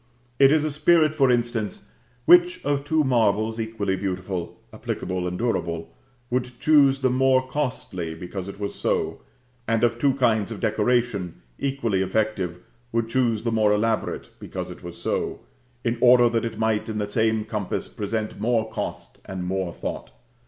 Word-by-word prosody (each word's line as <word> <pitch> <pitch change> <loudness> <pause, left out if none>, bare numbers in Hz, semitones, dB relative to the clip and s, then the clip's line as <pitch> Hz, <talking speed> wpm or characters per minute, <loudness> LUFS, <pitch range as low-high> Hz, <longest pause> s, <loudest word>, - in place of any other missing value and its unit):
It 135 0 +7
is 155 0 +3
a 155 - -1
spirit, 155 +1 +4
for 135 -4 +3
instance, 120 -3 -1 0.4
which 175 0 +6
of 140 -1 0
two 155 +1 +2
marbles, 110 -3 +1
equally 110 -4 -1
beautiful, 95 -2 -4
applicable 90 -1 -3
and 90 0 -3
durable, 85 -8 -2 0.4
would 125 -1 -2
choose 140 -2 +5
the 130 -1 +2
more 130 0 +3
costly 110 - -3
because 90 +3 -6
it 100 0 -8
was 100 -1 -3
so, - - -1 0.5
and 115 0 +1
of 120 0 +2
two 135 +1 +3
kinds 115 -5 +2
of 110 - -5
decoration, 110 - 0 0.2
equally 120 -8 0
effective, 95 -3 -1 0.3
would 115 0 0
choose 115 -3 +1
the 115 - 0
more 110 -2 +3
elaborate 110 +2 -1
because - - -6
it - - -11
was - - -8
so, - - -2 0.4
in 115 -1 -1
order 125 -1 +7
that 115 -1 0
it 115 -1 -4
might 110 -1 0
in 110 - -3
the 105 -1 -1
same 110 0 +1
compass 105 -3 -3
present 105 +1 -4
more 115 -1 +1
cost - - -6
and 95 -1 -5
more 95 -1 -2
thought. - - -6
115 Hz, 165 wpm, -24 LUFS, 100-125 Hz, 0.5 s, It